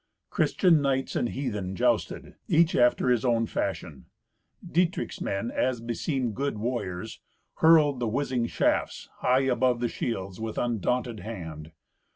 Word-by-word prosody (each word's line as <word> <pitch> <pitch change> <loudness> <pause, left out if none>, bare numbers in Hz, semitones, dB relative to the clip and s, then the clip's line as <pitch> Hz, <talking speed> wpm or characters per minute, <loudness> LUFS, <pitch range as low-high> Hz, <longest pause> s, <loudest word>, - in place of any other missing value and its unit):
Christian 170 -5 +3
knights 135 -1 0
and 120 - 0
heathen 105 -9 -3
jousted, - - 0
each 165 +1 +3
after 125 +1 +3
his 120 -3 +2
own 115 -2 +2
fashion. - - -4 0.6
Dietrich's 175 +2 -1
men, 100 +5 -2
as 130 -2 0
beseemed 120 +1 -2
good 140 0 -2
warriors, 110 -4 -4 0.4
hurled 155 -5 +5
the 120 - -1
whizzing 125 0 -1
shafts - - -1
high 130 +1 +2
above 130 -2 +1
the 120 - 0
shields, 95 -3 -4
with 110 -1 -4
undaunted 120 0 -1
hand. 80 -8 -7
120 Hz, 135 wpm, -27 LUFS, 110-135 Hz, 0.6 s, hurled